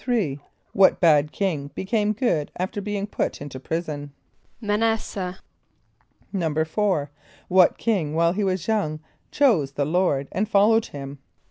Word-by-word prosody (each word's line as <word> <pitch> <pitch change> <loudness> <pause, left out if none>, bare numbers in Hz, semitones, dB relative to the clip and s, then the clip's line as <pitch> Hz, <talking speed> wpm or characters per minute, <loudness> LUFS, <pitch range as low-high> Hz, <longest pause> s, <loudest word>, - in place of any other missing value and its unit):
= - - -36
What 195 -1 +5
bad 150 -3 +4
king 165 -8 -2
became 210 +2 0
good 195 - 0
after 185 +3 -3
being 205 0 -3
put 210 - -3
into 140 -2 -7
prison? 145 -1 -4 0.5
=M[+a] 210 -3 -1
n[)a]s´seh.= 210 -4 -1 1.0
=4.= 160 -1 0 0.4
What 185 -1 +5
king 175 -10 0
while 170 +1 +3
he 205 +2 -1
was 185 -2 -1
young 175 -9 0 0.3
chose 190 - +2
the 140 - 0
Lord 150 -4 +1
and 205 +3 -1
followed 220 +3 +4
him? 140 0 -8
180 Hz, 135 wpm, -24 LUFS, 150-205 Hz, 1.0 s, What